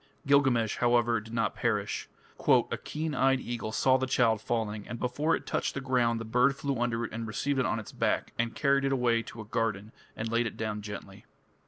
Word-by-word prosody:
Gilgamesh, 135 -6 +3
however, 120 -2 +3
did 110 +1 -12
not 115 -1 0
perish. 105 -4 -1 0.6
"A - - -1
keen 155 0 -3
eyed 135 -1 +3
eagle 120 -3 -4
saw 130 +3 +3
the 130 - -1
child 115 -4 +2
falling, 110 -3 -2
and 120 - -5
before 145 +6 +1
it - - -7
touched - - -1
the - - -1
ground 125 -3 +1
the 115 - -5
bird 125 +5 +3
flew 140 -3 -2
under 120 -1 0
it - - -8
and 115 0 -4
received 135 +6 -1
it 130 - +2
on 105 - 0
its 110 - -9
back, - - -1
and 115 0 0
carried 140 -1 +2
it 135 - +1
away 120 -3 +2
to 115 0 -9
a - - -9
garden 110 -2 -2 0.3
and 110 +1 -3
laid 115 0 +2
it - - -7
down 105 -1 -3
gently." 100 -2 -8
120 Hz, 215 wpm, -29 LUFS, 110-130 Hz, 0.6 s, Gilgamesh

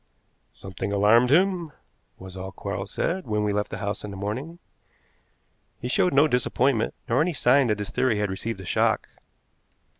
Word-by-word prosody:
"Something 95 +1 -6
alarmed 105 +5 +4
him," 175 0 +2 0.4
was 95 0 -11
all 95 0 -6
Quarles 100 0 -5
said 180 - -2
when 105 -1 0
we 105 -1 0
left 105 0 -1
the - - -5
house 100 0 -4
in 105 - -6
the 100 - -8
morning. 125 - -4 1.2
He 125 - -4
showed 180 +8 +2
no 145 +2 +5
disappointment, 125 -2 +1
nor 125 +4 +2
any 170 +2 +1
sign 130 -1 +3
that 105 -2 +1
his 105 -1 -5
theory 130 -5 +1
had 105 -2 -1
received 100 +2 -4
a - - -10
shock. - - +1
110 Hz, 175 wpm, -25 LUFS, 100-140 Hz, 1.2 s, no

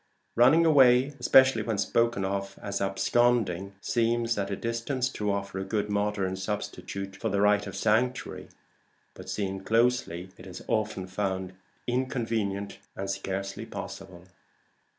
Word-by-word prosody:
Running 135 +8 +6
away, 135 -3 +5
especially 130 +1 +5
when 115 -3 -2
spoken 115 -1 +1
of 100 0 -3
as 100 -1 -4
absconding, 100 -1 +1
seems 115 0 +1
at 100 -1 -2
a 100 - -1
distance 115 +4 -2
to 105 -5 -2
offer 100 -1 -3
a - - -2
good 105 +1 -2
modern 100 -2 0
substitute 100 -1 -5
for - - -3
the 100 - 0
right 105 0 +3
of 100 - -7
sanctuary; 110 +5 0 0.6
but - - -11
seen 95 -2 -3
closely, 115 -5 +1
it 90 - -11
is 90 -1 -9
often 105 -3 -1
found 95 -1 -3 0.3
inconvenient 115 -5 -2 0.2
and 95 0 -3
scarcely 95 0 -4
possible. 90 -2 -8
105 Hz, 135 wpm, -28 LUFS, 95-120 Hz, 0.6 s, Running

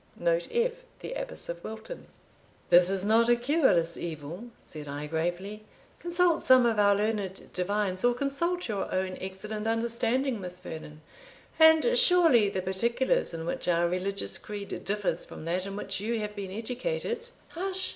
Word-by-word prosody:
* - - -32
Note - - +1
F. 475 +1 0 0.2
The - - -5
Abbess - - -5
of 170 0 -6
Wilton. 220 - -8 0.6
"This 175 +1 +7
is 195 0 +1
not 225 +2 +4
a 240 - +6
cureless 240 - +2
evil," 165 +5 -6
said 150 -2 -7
I 145 +1 -5
gravely. 175 +7 -3 0.4
"Consult 345 -1 +2
some 255 -1 +7
of 225 -3 +2
our 200 -1 +5
learned 205 -2 -2
divines, 190 0 -1
or 245 0 +3
consult 335 +7 -1
your 205 -4 -3
own 185 0 -1
excellent 210 +3 -5
understanding, 235 +2 0
Miss 180 0 -6
Vernon; 155 -3 -9 0.6
and 320 +9 +6
surely 345 - +5
the 190 -2 -3
particulars 235 - +1
in 165 -1 -5
which 170 - -4
our 170 0 +3
religious 185 +3 -2
creed 205 -1 -7
differs 205 0 -1
from - - -9
that 180 +3 -1
in 195 - -6
which 195 -2 -3
you 225 +3 -2
have 210 -1 -5
been 195 -2 -5
educated" 455 - -4 0.2
"Hush!" 375 +2 -3
210 Hz, 165 wpm, -28 LUFS, 185-275 Hz, 0.6 s, This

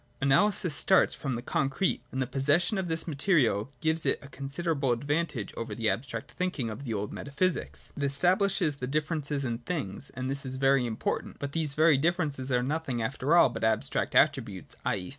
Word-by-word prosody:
Analysis 160 +5 +3
starts 190 +6 +4
from 135 -4 -3
the 120 - -5
concrete; 135 +9 0
and 130 - -4
the 130 - +1
possession 145 - +2
of 185 - -2
this 160 0 -2
material 140 - +2
gives 160 0 +1
it - - +2
a 140 - -11
considerable 140 +1 -2
advantage 145 -1 -1
over 115 -2 -5
the 110 -1 +1
abstract 115 -2 -5
thinking 155 -11 -2
of 110 +7 -7
the 115 - -2
old 100 0 -3
metaphysics. 160 +6 -2
It - - -6
estabhshes 170 +2 +2
the 125 - -3
differences 150 -1 -1
in 115 -2 -2
things: 125 - -4
and 130 0 -3
this 140 +1 -3
is 130 -1 -4
very 135 -1 +3
important: 110 -2 -3
but 140 0 -4
these 155 -3 -1
very 155 -2 +5
differences 150 -5 0
are 125 -1 +2
nothing 140 -3 -2
after 135 +7 +1
all 170 - +7
but 120 - -6
abstract 110 -1 0
attributes, - - +1
/. - - +2
e. 90 -2 -7
140 Hz, 190 wpm, -29 LUFS, 125-160 Hz, -, all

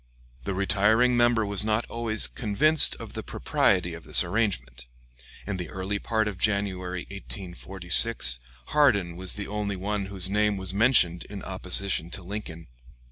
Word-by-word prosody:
The 100 - -3
retiring 105 +5 +2
member 120 -2 +2
was 100 0 +1
not 110 +1 0
always 115 -2 -2
convinced 140 +8 +2
of - - -10
the - - -5
propriety - - 0
of - - -10
this - - +2
arrangement. 70 - -3 0.6
In 100 -2 -4
the 90 -2 -6
early 95 +2 -4
part 110 0 -1
of 100 -3 -6
January, 95 -4 -1
1846, 95 - +2 0.3
Hardin 100 - +2
was 95 +1 +1
the 105 - -6
only 105 -1 -3
one 100 +1 -3
whose 95 -2 +1
name 105 +1 0
was 95 -1 -2
mentioned 100 -6 +2
in 100 -1 -9
opposition 95 -2 0
to 90 +2 -7
Lincoln. 85 -4 -7
100 Hz, 150 wpm, -26 LUFS, 90-110 Hz, 0.6 s, retiring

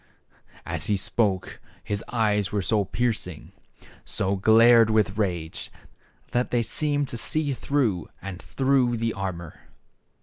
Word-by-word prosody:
And 85 - -3
as 80 - -4
he 105 - +2
spoke 95 -1 -1 0.2
his 100 -1 -3
eyes 105 -5 +1
were 100 -1 -1
so 105 0 +1
piercing, 110 -6 -3 0.7
and 100 -1 0
glared 115 +1 +7
so 110 - 0
with 105 -1 +1
rage, 85 -6 -3 0.6
that 125 +1 0
they 120 -1 +1
seemed 145 +3 -1
to 120 - -5
see 150 +1 -1
through 120 - -1
and 95 -2 -7
through 130 -3 +1
the 115 0 -1
armor. 85 -5 -6
110 Hz, 140 wpm, -25 LUFS, 95-120 Hz, 0.7 s, glared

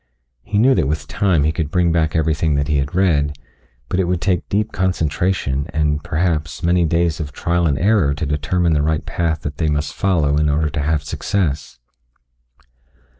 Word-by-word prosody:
He 100 - -3
knew 125 +5 +5
that 95 - +1
with 75 -1 -2
time 90 -7 +1
he 75 - +2
could 80 -2 -3
bring 90 0 +2
back 80 -1 +1
everything 80 -1 +1
that 70 0 0
he 75 -1 +1
had 70 +5 -2
read, 75 -6 +2 0.5
but 90 - -1
it 95 - +2
would 90 0 0
take 90 -2 -1
deep 105 +2 0
concentration 80 -5 -1
and, 75 -1 0
perhaps, 80 -1 -1
many 85 0 +3
days 85 0 +1
of 75 -3 -4
trial 85 +3 0
and 70 -3 +1
error 95 -5 +2
to 75 - -3
determine 75 +4 0
the 75 - +2
right 80 +1 0
path 80 -3 -1
that 75 0 -5
they 80 -2 0
must 75 -1 -1
follow 80 -7 +1
in 75 0 +2
order 75 +1 0
to 80 -1 -2
have 75 0 0
success. 75 0 -2
80 Hz, 190 wpm, -19 LUFS, 75-90 Hz, 0.5 s, knew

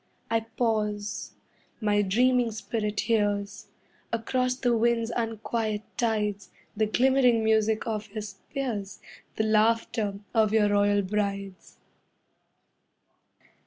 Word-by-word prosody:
I 225 - +3
pause, 215 -2 -2 0.5
my 210 -2 +2
dreaming 245 +4 +3
spirit 210 0 -2
hears, 205 -3 -1 0.4
Across 250 +2 0
the 245 -2 +1
wind's 230 0 +1
unquiet 225 -2 -2
tides, 210 -4 -1 0.3
The 215 0 +1
glimmering 250 0 +3
music 220 0 +2
of 215 -2 -3
your 215 0 -4
spears, 205 0 -5 0.4
The 220 - 0
laughter 220 -1 +2 0.2
of 220 -2 +3
your 210 -2 +4
royal 205 0 +3
brides. 200 -1 -3
220 Hz, 100 wpm, -27 LUFS, 205-230 Hz, 0.5 s, your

